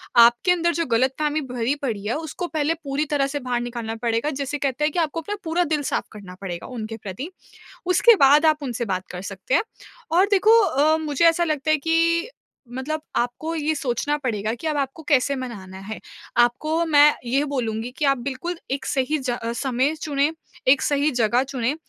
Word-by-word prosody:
आपके 235 +8 +6
अंदर 340 -1 +2
जो 335 0 -1
ग़लतफ़हमी 265 +5 +1
भरी 250 +2 0
पड़ी 220 -7 -3
है, 230 - 0
उसको 325 +3 -4
पहले 310 -1 0
पूरी 280 +1 -1
तरह 280 -2 +2
से 290 +1 -3
बाहर 250 -2 -2
निकालना 235 -2 -4
पड़ेगा 230 +4 0
जैसे 280 +1 -3
कहते 275 0 -2
हैं 300 - +2
कि - - 0
आपको 330 0 -1
अपना 410 +6 -4
पूरा 340 +1 +1
दिल 310 -3 0
साफ़ - - -1
करना 195 -4 -10
पड़ेगा 175 -3 -5
उनके 225 -3 -6
प्रति। 210 - -7 0.6
उसके 370 +6 +6
बाद 290 +1 +6
आप 305 -1 +3
उनसे 245 -3 -3
बात 185 -3 -3
कर 180 0 -6
सकते 195 +5 -4
हैं - - +4 0.5
और 365 +4 +5
देखो 425 +3 +6
अ, 310 -2 +3
मुझे 305 0 0
ऐसा 330 +1 +2
लगता 310 -2 -1
है 310 - +5
कि 330 +4 +1 0.4
मतलब 280 +5 -3 0.2
आपको 245 +7 -1
ये 315 -1 0
सोचना 285 +1 -1
पड़ेगा 220 -4 -1
कि 240 - -8
अब 305 -1 0
आपको 275 +3 -3
कैसे 280 -1 +3
मनाना 205 -8 -7
है? 205 +3 -7 0.4
आपको 285 +8 +2
मैं 295 -1 +6
ये 265 +4 +1
बोलूँगी 240 -5 -3
कि 300 - 0
आप 275 -1 +3
बिल्कुल 280 +8 -4
एक 270 0 -2
सही 275 +3 0
ज 255 -3 -2 0.2
समय 265 +3 0
चुनें, 290 0 +1 0.3
एक 260 +1 +5
सही 290 +1 +2
जगह 240 -1 +2
चुनें, 265 -1 -2
275 Hz, 195 wpm, -23 LUFS, 240-310 Hz, 0.6 s, आपके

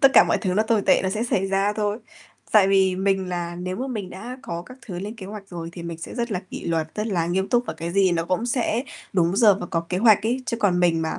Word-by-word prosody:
tất 275 - +8
cả - - +9
mọi - - +1
thứ 185 -4 -1
nó 215 - +3
tồi 220 -1 +1
tệ - - +4
nó 190 - 0
sẽ 215 +3 -1
xảy 195 -5 0
ra 195 +1 +1
thôi. 210 0 -1 0.5
Tại 205 -3 +6
vì 190 -1 +3
mình 190 -1 0
là 175 -1 -3
nếu 185 +1 -4
mà 255 +5 -3
mình 210 -8 -5
đã 235 +7 -8
có 170 -9 -5
các 255 +8 -13
thứ 180 -5 -5
lên 205 +4 -5
kế 190 -4 -8
hoạch 200 -1 -9
rồi 170 -3 -6
thì 170 - -8
mình 170 -1 -6
sẽ 165 - -8
rất 235 -2 -2
là 180 - -1
kỷ - - -7
luật, 160 -2 -1
rất 210 +1 -2
là 175 -6 0
nghiêm 190 +2 0
túc 245 -1 +2
và - - -4
cái 165 +1 -5
gì 195 -2 +3
nó 165 -1 0
cũng 185 +7 -1
sẽ 240 -1 0 0.3
đúng 175 0 +2
giờ 210 -2 +6
và 175 - -4
có 165 - -1
kế 180 - -1
hoạch 215 -1 +5
ấy. 255 +2 0
Chứ 230 - -1
còn 195 -6 +2
mình 165 -2 +3
mà 160 - -2
195 Hz, 295 wpm, -23 LUFS, 175-215 Hz, 0.5 s, cả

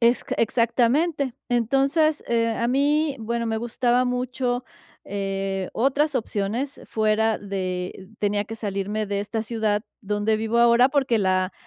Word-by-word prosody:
es 235 +1 +3
q - - -3
Exactamente. 255 +5 +2
Entonces, 275 +6 +2
eh, 230 -1 +2
a 230 +1 -1
mí, 285 +2 +2
bueno, 235 +1 -2
me 220 0 -1
gustaba 240 +1 +1
mucho, 250 0 -1 0.4
eh, 195 -1 -3
otras 280 +4 +1
opciones 225 +6 -2
fuera 220 0 +1
de 185 -1 -4
tenía 205 0 0
que 225 +2 -7
salirme 205 0 -2
de 200 0 -1
esta 215 +2 -3
ciudad 215 -2 -1 0.2
donde 210 +1 0
vivo 225 +2 0
ahora 235 +2 +6
porque 265 -4 +1
la 185 -1 +1
230 Hz, 140 wpm, -24 LUFS, 205-250 Hz, 0.4 s, ahora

